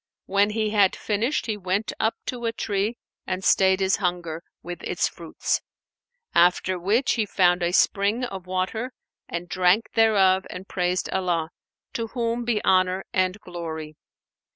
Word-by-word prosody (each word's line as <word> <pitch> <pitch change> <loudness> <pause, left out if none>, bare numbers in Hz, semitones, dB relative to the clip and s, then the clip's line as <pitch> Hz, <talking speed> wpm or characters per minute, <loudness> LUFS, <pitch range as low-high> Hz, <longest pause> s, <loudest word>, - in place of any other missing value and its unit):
When 200 +2 +3
he 215 0 -1
had 205 -3 +4
finished, 225 +7 -1
he 215 -2 -2
went 195 +3 -1
up 220 - +1
to 240 -2 -4
a 230 - +1
tree 210 +1 -2 0.3
and 185 0 -2
stayed 190 0 +4
his 190 0 +2
hunger 175 -4 -2 0.2
with 175 +1 -7
its - - 0
fruits; - - -2 0.7
after 180 +1 +3
which 210 +9 +2
he 220 -3 0
found 180 -2 +3
a 170 0 +1
spring 200 +6 +2
of 190 -6 -5
water 190 +7 -2 0.4
and 170 +1 -4
drank 185 +5 +2
thereof 195 -4 +4
and 185 +1 -8
praised 180 0 -1
Allah, 175 -4 0 0.4
to 230 -1 -2
whom 235 0 -1
be 225 -3 0
honour 185 0 +3
and 185 +2 +1
glory! 160 -3 -6
190 Hz, 150 wpm, -25 LUFS, 180-215 Hz, 0.7 s, had